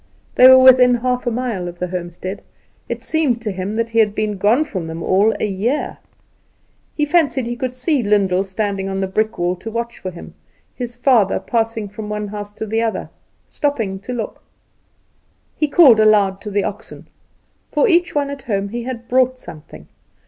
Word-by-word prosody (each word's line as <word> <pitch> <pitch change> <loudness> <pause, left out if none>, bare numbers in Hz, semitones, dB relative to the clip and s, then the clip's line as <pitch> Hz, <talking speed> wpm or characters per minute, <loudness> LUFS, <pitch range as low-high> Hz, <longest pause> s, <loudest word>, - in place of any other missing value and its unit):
They 255 - +7
were 260 0 +9
within 255 -1 +7
half 250 +1 -2
a - - +4
mile 225 -7 -3
of 175 0 -8
the 180 0 -4
homestead. 180 +2 -6 0.5
It - - -4
seemed 295 -7 0
to 215 - -2
him 190 +3 -4
that 230 0 -2
he 230 - +2
had 210 -2 +3
been 215 -1 -2
gone 230 +10 +3
from 185 - -5
them 165 +1 -6
all 205 +4 +2
a - - 0
year. 210 +8 -2 1.0
He 300 - +2
fancied 295 -5 +1
he 240 +1 -3
could 255 +1 -4
see 265 +2 0
Lyndall 200 -3 +2
standing 195 0 -3
on 195 0 -3
the 195 - 0
brick 215 +3 -1
wall 175 +1 0
to 225 - -7
watch 235 +1 -5
for 185 - -5
him; 175 -2 -11 0.4
his 240 -1 -6
father, 245 -6 +3
passing 225 -2 -2
from 210 +1 -8
one 210 -1 -4
house 205 0 -6
to 220 - -5
the 225 +1 -1
other, 225 -1 -3 0.4
stopping 225 -10 -2
to 210 +6 -8
look. 235 -3 -5 1.1
He 305 - 0
called 280 -7 +6
aloud 205 -3 +3
to 210 - -6
the 205 0 0
oxen. - - -7 0.6
For - - +2
each 350 -4 +2
one 285 -1 0
at 280 -1 -7
home 200 -4 -2
he 240 +3 -4
had 235 -1 -7
brought 255 0 +2
something. 150 - -12
220 Hz, 190 wpm, -19 LUFS, 195-250 Hz, 1.1 s, were